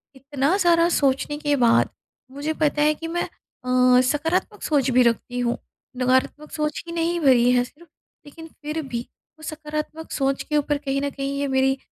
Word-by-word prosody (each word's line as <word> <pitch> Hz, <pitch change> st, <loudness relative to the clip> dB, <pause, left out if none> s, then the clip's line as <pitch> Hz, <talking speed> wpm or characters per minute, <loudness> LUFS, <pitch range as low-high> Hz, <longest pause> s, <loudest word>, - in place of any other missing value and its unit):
इतना 275 Hz, +5 st, 0 dB
सारा 340 Hz, -3 st, +4 dB
सोचने 285 Hz, -1 st, +1 dB
के 290 Hz, -1 st, 0 dB
बाद 230 Hz, -1 st, +4 dB, 0.4 s
मुझे 290 Hz, +3 st, -3 dB
पता 295 Hz, 0 st, +2 dB
है 305 Hz, +1 st, +4 dB
कि 325 Hz, -, -6 dB
मैं 345 Hz, +1 st, -1 dB
अ, 250 Hz, 0 st, +1 dB
सकारात्मक 315 Hz, +7 st, -1 dB
सोच 280 Hz, -4 st, +1 dB
भी 250 Hz, +1 st, +5 dB
रखती 240 Hz, +1 st, 0 dB
हूँ, 240 Hz, -1 st, 0 dB, 0.4 s
नकारात्मक 260 Hz, +4 st, 0 dB
सोच 300 Hz, -1 st, -2 dB
ही 335 Hz, -, -6 dB
नहीं 340 Hz, +1 st, 0 dB
भरी 250 Hz, -5 st, +5 dB
है 245 Hz, -1 st, +3 dB
सिर्फ़। 310 Hz, +7 st, -15 dB, 0.4 s
लेकिन 325 Hz, +3 st, -11 dB
फ़िर 305 Hz, 0 st, -5 dB
भी, 250 Hz, -4 st, -4 dB, 0.4 s
वो 315 Hz, -, -14 dB
सकारात्मक 310 Hz, +1 st, -6 dB
सोच 275 Hz, -1 st, 0 dB
के 300 Hz, -, -1 dB
ऊपर 295 Hz, 0 st, 0 dB
कहीं 275 Hz, -1 st, -2 dB
न 285 Hz, -, -1 dB
कहीं 275 Hz, 0 st, -4 dB
ये 285 Hz, -, 0 dB
मेरी 265 Hz, 0 st, +2 dB
285 Hz, 180 wpm, -23 LUFS, 260-310 Hz, 0.4 s, भी